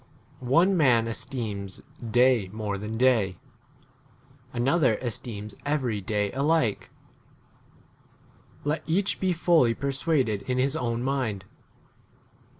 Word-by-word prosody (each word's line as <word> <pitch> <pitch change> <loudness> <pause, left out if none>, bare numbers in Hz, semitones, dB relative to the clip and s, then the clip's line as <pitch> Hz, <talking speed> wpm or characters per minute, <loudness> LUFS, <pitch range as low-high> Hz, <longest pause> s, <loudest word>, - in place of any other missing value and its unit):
One 175 +8 +4
man 125 -8 +4
esteems 110 -5 -4 0.2
day 120 -3 +3
more 105 -2 -3
than 105 +2 -5
day; 115 -8 +2 1.1
another 130 0 +2
esteems 110 -3 -5
every 130 -8 -1
day 105 0 -1
[alike]. 140 -5 +1 1.7
Let 150 +2 -1
each 190 +5 0
be 190 -1 +1
fully 165 -8 +3
persuaded 135 -6 0
in 125 - +1
his 135 +3 +1
own 120 -4 -2
mind. 125 -8 -2
125 Hz, 100 wpm, -26 LUFS, 110-140 Hz, 1.7 s, One